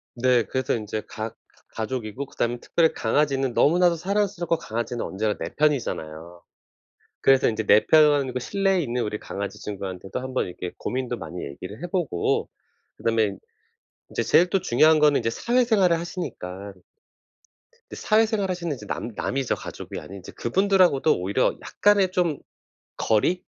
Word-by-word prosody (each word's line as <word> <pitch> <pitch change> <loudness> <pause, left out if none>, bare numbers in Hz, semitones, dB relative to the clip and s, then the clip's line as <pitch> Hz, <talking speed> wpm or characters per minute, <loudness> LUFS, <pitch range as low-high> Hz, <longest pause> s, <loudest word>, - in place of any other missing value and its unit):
네. 125 -1 +3
그래서 130 +5 -1
인제 110 -1 -4
가 110 -1 -5
가 115 - -26 0.4
가족이고 115 +2 -4
그다음에 120 -2 -2
특별히 165 -2 +2
강아지는 135 +1 +1
너무나도 175 +6 +4
사랑스럽고 180 -1 0
강아지는 120 -4 -4
언제나 105 +2 -2
내 85 +2 -6
편이잖아요. 85 - -1 0.8
그래서 135 -2 +5
인제 110 0 -2
내 105 +1 +5
편 145 -4 +5
그 125 - -1
실내에 195 +7 +1
있는 125 -4 -2
우리 105 0 -3
강아지 100 0 -6
친구한테도 95 0 -5
한번 130 0 -2
이렇게 90 0 -6
고민도 125 -1 -3
많이 90 -5 -7
얘기를 90 - -8
해보고 175 - -1 0.5
그다음에 110 -4 0 0.7
이제 - - -1
제일 180 +1 +4
또 195 - +2
중요한 155 +5 +4
거는 150 -1 +4
이제 - - -1
사회생활을 220 - +2
하시니까 100 - -6 1.2
근데 - - -8
사회생활 215 -2 +2
하시는 170 -4 -2
이제 - - -11
남 - - -4
남이죠 135 -2 -1
가족이 - - -8
아닌. 100 +1 -10
이제 90 - -11
그분들하고도 180 - +3
오히려 100 +8 +1
약간의 200 -3 +2
좀 175 -5 +1 0.6
거리? 170 +12 +1
130 Hz, 370 characters per minute, -24 LUFS, 110-175 Hz, 1.2 s, 그래서